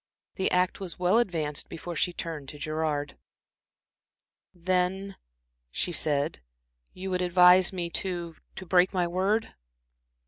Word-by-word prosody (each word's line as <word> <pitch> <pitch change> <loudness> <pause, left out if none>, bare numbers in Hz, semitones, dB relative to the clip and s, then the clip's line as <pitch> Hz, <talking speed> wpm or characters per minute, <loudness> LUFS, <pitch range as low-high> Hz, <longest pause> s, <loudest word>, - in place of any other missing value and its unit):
The 190 - 0
act 180 0 +1
was 185 -4 -6
well 180 +5 +3
advanced 160 -9 -2
before 170 +2 -7
she 180 - +1
turned 160 -5 -6
to 150 - -9
Gerard. 155 -1 -2 1.3
"Then," 185 +2 -1 0.5
she 175 - -2
said, 150 -2 0 0.5
"you 190 +1 -6
would 180 0 0
advise 180 0 +6
me 175 -3 -3
to 175 -3 -2 0.2
to 190 - -7
break 180 +1 +3
my 180 -1 +2
word?" 195 +6 0
180 Hz, 130 wpm, -28 LUFS, 160-185 Hz, 1.3 s, advise